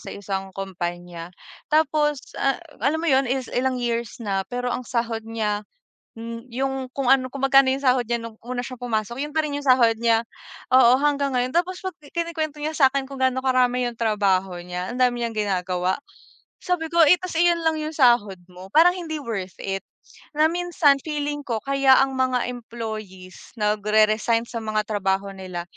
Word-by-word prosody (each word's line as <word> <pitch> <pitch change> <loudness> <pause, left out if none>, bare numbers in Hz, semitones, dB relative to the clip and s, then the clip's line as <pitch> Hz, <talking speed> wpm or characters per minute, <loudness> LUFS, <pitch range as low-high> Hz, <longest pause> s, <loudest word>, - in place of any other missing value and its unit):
sa - - -10
isang 195 -1 -4
kompanya 175 -2 -5 0.5
tapos 295 -2 +2 0.2
a 275 - +1 0.2
alam 315 +3 +1
mo 335 - 0
'yon, 265 0 +3
is 260 0 -2
ilang 255 +1 0
years 235 -1 -2
na 195 -3 -1
pero 245 0 -3
ang 250 - -4
sahod 230 -2 -2
niya, 210 -2 -1 0.6
hmm, 230 +2 -7
yung 265 0 -3
kung 275 -3 -2
ano, 265 -1 +4
kung 275 - -6
magkano 270 -1 +5
'yong 275 0 -4
sahod 250 -1 +4
niya 235 0 0
nung 230 -1 -8
una 250 0 -4
siyang 255 -2 -9
pumasok 235 0 -2
yun 300 - -6
pa 315 - +1
rin 285 - -3
yung 290 - -6
sahod 235 -3 +5
niya, 230 0 +3 0.5
oo, 250 -1 +7
hanggang 285 -2 +1
ngayon. 250 0 0
Tapos 360 +2 0
'pag 375 -1 -5 0.2
kinukwento 320 -3 -3
niya 310 +1 -2
sa'kin 270 -1 +3
kung 275 - -8
gaano 260 0 +2
karami 250 -1 +2
yung 235 - -11
trabaho 195 -5 +1
niya, 180 +2 -5
ang 250 - -6
dami 245 -1 +2
niyang 225 -2 -4
ginagawa, 185 -1 0 0.7
sabi 355 -3 -1
ko, 340 - +1
"Eh 360 - +8
tas 365 -1 -6
iyon 345 0 +3
lang 320 -1 +1
yung 310 +1 -4
sahod 240 -8 +4 0.2
mo, 180 +1 -11
parang 335 +3 +7
hindi 325 -3 -5
worth 195 -7 -5
it." 195 0 -2 0.6
Na 310 - +5
minsan 345 -5 +2
feeling 295 -1 -2
ko 230 -3 -2
kaya 275 -1 +4
ang 270 0 -3
mga 255 -1 +1
employees 215 -6 -8
nag-re-resign 215 +2 +2
sa 230 - -5
mga 215 0 0
trabaho 195 -1 -1
nila 185 -2 -6
245 Hz, 185 wpm, -23 LUFS, 215-275 Hz, 0.7 s, Eh